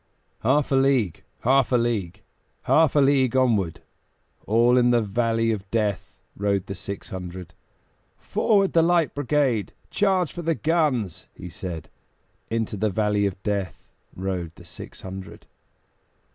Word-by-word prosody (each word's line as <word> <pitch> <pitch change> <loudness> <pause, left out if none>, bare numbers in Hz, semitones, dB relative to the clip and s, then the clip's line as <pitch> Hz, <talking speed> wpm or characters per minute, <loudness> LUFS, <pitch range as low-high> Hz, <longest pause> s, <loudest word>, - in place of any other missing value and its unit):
Half 140 +5 +2
a - - +4
league, 135 - +2 0.2
half 135 +1 +3
a - - +4
league, 105 -6 -1 0.4
Half 160 -3 +3
a - - +5
league 135 -2 +3
onward, 110 -10 +1 0.7
All 115 +3 +4
in 125 -1 +4
the 120 -1 +4
valley 115 +2 +1
of 100 -3 -4
Death 105 -4 -2 0.2
Rode 100 -1 0
the 100 - -5
six 100 +1 -6
hundred. 90 -2 -7 0.6
"Forward, 200 -3 +1
the 165 - +5
Light 170 -1 +2
Brigade! 140 -6 0 0.2
Charge 190 -5 +1
for 175 - -5
the 165 -1 0
guns!" 145 - 0
he 90 - -8
said; 85 -4 -6 0.6
Into 115 -2 -2
the 110 +2 +1
valley 105 0 +1
of 95 -1 -7
Death 95 -6 -3 0.3
Rode 90 -3 -4
the - - -15
six - - -10
hundred. 95 0 -9
115 Hz, 145 wpm, -24 LUFS, 95-135 Hz, 0.7 s, a